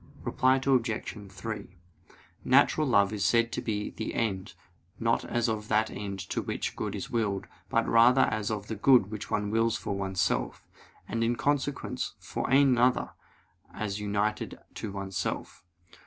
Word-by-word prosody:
Reply 130 +1 +3
Obj. 115 -6 -1
3: 100 -1 -7 0.7
Natural 155 -1 +4
love 100 -4 +3
is 100 -2 -2
said 115 +2 +3
to - - -3
be 105 -2 -2
of - - -18
the 110 - -4
end, 95 -4 -2 0.4
not 115 0 +1
as 120 -1 0
of 110 -1 -2
that 110 0 +2
end 100 -1 -5
to - - 0
which - - -3
good - - -3
is - - -6
willed, 105 -4 0 0.2
but - - +1
rather 120 +3 +6
as 110 -4 +1
of 105 -2 -3
that 105 -1 -6
good 120 -7 +5
which 110 -1 -6
one 105 0 -1
wills 115 0 +2
for 105 -2 -3
oneself, 95 -2 -1 0.4
and 115 0 -1
in 120 +1 +1
consequence 145 0 -1
for - - -4
another, 130 -2 +4 0.6
as 105 -1 -3
united 105 +1 -1 0.2
to 105 - -5
oneself. 95 -2 -4
110 Hz, 155 wpm, -29 LUFS, 100-120 Hz, 0.7 s, rather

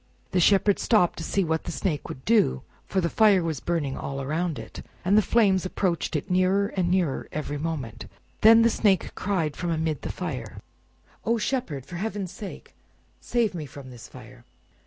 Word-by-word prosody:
The 185 - +2
Shepherd 195 +2 +4
stopped 210 -8 +2
to - - -4
see 195 +3 0
what 160 -1 -1
the - - -3
Snake 160 -8 -2
would 130 - -8
do, 210 - +3 0.2
for 190 - 0
the 170 - +1
fire 205 -4 +4
was 160 -4 -2
burning 160 -6 -2
all 135 0 -5
around 155 +4 -2
it, - - -8 0.2
and 195 +3 +4
the 215 - +7
flames 195 -3 +3
approached 185 -2 -1
it - - -2
nearer 185 +2 +2
and 180 -2 -1
nearer 175 -7 0
every 145 -1 -4
moment. 145 -8 -4 0.3
Then 225 +1 +8
the 230 - +4
Snake 200 -4 +1
cried 175 -7 -1
from 175 - -3
amid 160 -3 -1
the - - -4
fire— - - -5 0.7
"Oh, 230 +1 +1
Shepherd! 210 - -2
for 175 - -7
heaven's 200 -2 -3
sake 195 +1 -9 0.5
save 235 -4 0
me 155 -4 -5
from 135 -1 -11
this 120 -3 -11
fire!" 125 0 -14
175 Hz, 185 wpm, -26 LUFS, 150-200 Hz, 0.7 s, Then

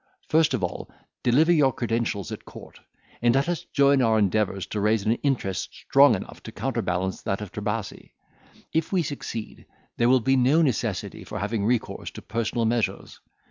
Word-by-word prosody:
First 160 -3 +3
of 105 - -4
all, 90 - -4 0.3
deliver 145 +8 +4
your 145 -5 +4
credentials 115 -5 -2
at - - -7
court, - - -13 0.4
and 120 +1 +3
let 135 +3 +2
us 175 -3 -2
join 140 -1 +3
our 110 -2 +3
endeavours 100 -2 +1
to 105 - -4
raise 105 0 +1
an 110 - +3
interest 125 -10 -2
strong 135 -4 +5
enough 95 - -8
to - - -9
counterbalance 90 +1 -2
that 100 - -2
of 105 -3 -7
Trebasi. 105 0 -4 0.6
If 160 0 0
we 185 -3 +2
succeed, 125 -6 -6 0.3
there 120 0 +3
will 130 0 +5
be 135 +3 +2
no 135 +6 +4
necessity 130 -8 -2
for - - -7
having 105 0 -2
recourse 120 -1 -1
to - - -9
personal 115 +1 -1
measures. 115 0 -1
115 Hz, 175 wpm, -25 LUFS, 105-135 Hz, 0.6 s, strong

